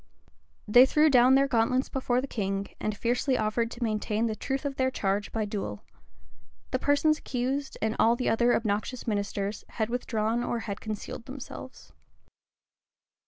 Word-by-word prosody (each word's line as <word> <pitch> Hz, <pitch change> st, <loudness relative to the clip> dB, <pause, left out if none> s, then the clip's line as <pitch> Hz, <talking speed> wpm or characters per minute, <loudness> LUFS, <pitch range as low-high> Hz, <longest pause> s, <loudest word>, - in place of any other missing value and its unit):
They 245 Hz, +5 st, +7 dB
threw 305 Hz, +2 st, +4 dB
down 255 Hz, 0 st, +6 dB
their 275 Hz, +1 st, +4 dB
gauntlets 255 Hz, +1 st, +2 dB
before 255 Hz, -2 st, 0 dB
the -, -, -3 dB
king, 195 Hz, -4 st, -2 dB
and 215 Hz, -1 st, -2 dB
fiercely 250 Hz, +2 st, +1 dB
offered 220 Hz, +2 st, 0 dB
to 240 Hz, +1 st, -6 dB
maintain 215 Hz, 0 st, 0 dB
the 220 Hz, -2 st, -1 dB
truth 270 Hz, +5 st, -3 dB
of 280 Hz, -1 st, -3 dB
their 260 Hz, 0 st, +2 dB
charge 200 Hz, -4 st, -1 dB
by 220 Hz, -1 st, -1 dB
duel. 205 Hz, -1 st, -5 dB, 0.9 s
The -, -, 0 dB
persons 300 Hz, +2 st, +2 dB
accused, 265 Hz, +3 st, -3 dB
and 220 Hz, 0 st, 0 dB
all 230 Hz, +1 st, +5 dB
the 250 Hz, -, -2 dB
other 240 Hz, +2 st, +3 dB
obnoxious 220 Hz, +3 st, -2 dB
ministers, 205 Hz, -1 st, -2 dB
had 220 Hz, 0 st, 0 dB
withdrawn 230 Hz, -1 st, -1 dB
or 240 Hz, -1 st, -2 dB
had 200 Hz, -3 st, -5 dB
concealed 215 Hz, +1 st, -6 dB
themselves. 260 Hz, -1 st, -9 dB
235 Hz, 160 wpm, -28 LUFS, 215-260 Hz, 0.9 s, They